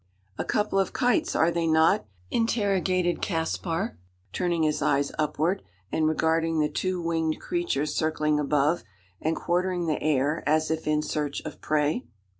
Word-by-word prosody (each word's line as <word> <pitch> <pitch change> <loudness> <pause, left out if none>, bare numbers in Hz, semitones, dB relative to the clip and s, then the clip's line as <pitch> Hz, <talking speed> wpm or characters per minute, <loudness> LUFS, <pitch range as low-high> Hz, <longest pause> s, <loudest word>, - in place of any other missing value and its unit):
"A - - +1
couple 210 -2 +1
of 195 - 0
kites, 260 +6 +1
are 165 +2 +3
they 170 -1 0
not?" 160 -8 +3 0.2
interrogated 190 -6 +1
Caspar, 165 - -2 0.3
turning 175 -3 0
his 155 -1 +1
eyes 140 0 +2
upward, 155 +5 0 0.3
and 155 -1 +2
regarding 160 +1 +1
the 150 0 +2
two 185 +4 -1
winged 165 -2 -1
creatures 345 - -1
circling 150 -1 +1
above, 150 +2 +1 0.4
and 160 +1 0
quartering 180 0 0
the 155 -2 -1
air 150 +1 +1
as 155 +1 +2
if 160 -1 -2
in 150 0 +2
search 150 -2 -2
of 155 - -8
prey. 150 -3 +1
160 Hz, 150 wpm, -26 LUFS, 150-180 Hz, 0.4 s, are